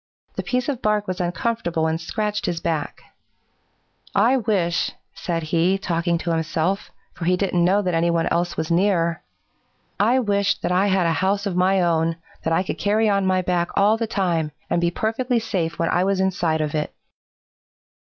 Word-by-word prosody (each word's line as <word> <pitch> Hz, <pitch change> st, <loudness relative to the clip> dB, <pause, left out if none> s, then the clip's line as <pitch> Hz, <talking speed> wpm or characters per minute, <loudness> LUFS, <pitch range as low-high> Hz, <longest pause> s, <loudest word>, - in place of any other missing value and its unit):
The -, -, -2 dB
piece 250 Hz, -1 st, -1 dB
of 270 Hz, -4 st, -2 dB
bark 210 Hz, -1 st, +1 dB
was 185 Hz, -1 st, -3 dB
uncomfortable 175 Hz, -2 st, -1 dB
and 160 Hz, +1 st, -1 dB
scratched 210 Hz, +5 st, -2 dB
his 170 Hz, -2 st, -1 dB
back, 160 Hz, -4 st, -3 dB, 1.1 s
'I 235 Hz, +7 st, +4 dB
wish,' 195 Hz, -7 st, 0 dB, 0.2 s
said 165 Hz, -2 st, -3 dB
he, 170 Hz, +4 st, +2 dB
talking 170 Hz, -2 st, 0 dB
to 170 Hz, 0 st, -3 dB
himself, 165 Hz, +3 st, -1 dB, 0.2 s
for 170 Hz, -, -6 dB
he 180 Hz, +1 st, +3 dB
didn't 180 Hz, -3 st, +1 dB
know 195 Hz, +4 st, +3 dB
that 180 Hz, -2 st, -1 dB
any 165 Hz, +1 st, +2 dB
one 170 Hz, -1 st, +1 dB
else 175 Hz, +1 st, 0 dB
was 160 Hz, +1 st, -2 dB
near, 170 Hz, -2 st, +2 dB, 0.8 s
'I 235 Hz, +5 st, +4 dB
wish 200 Hz, -2 st, +1 dB
that -, -, -1 dB
I 185 Hz, +3 st, +3 dB
had 190 Hz, -2 st, +2 dB
a 165 Hz, -, +2 dB
house 195 Hz, +4 st, 0 dB
of 195 Hz, -3 st, -2 dB
my 185 Hz, +1 st, +3 dB
own 165 Hz, -1 st, +1 dB, 0.3 s
that 160 Hz, -, -1 dB
I 165 Hz, +3 st, +2 dB
could -, -, -5 dB
carry 215 Hz, +2 st, +2 dB
on 200 Hz, -1 st, +1 dB
my 185 Hz, 0 st, +2 dB
back 175 Hz, -1 st, 0 dB
all 205 Hz, +2 st, +4 dB
the 225 Hz, 0 st, -2 dB
time 170 Hz, -7 st, 0 dB, 0.2 s
and 175 Hz, -, +2 dB
be 170 Hz, -, +2 dB
perfectly 235 Hz, +7 st, -1 dB
safe 170 Hz, -7 st, -2 dB
when 165 Hz, -, 0 dB
I 175 Hz, -, +2 dB
was 195 Hz, 0 st, +1 dB
inside 175 Hz, -4 st, +1 dB
of 150 Hz, -1 st, -2 dB
it.' 150 Hz, -1 st, -1 dB
180 Hz, 190 wpm, -22 LUFS, 170-200 Hz, 1.1 s, I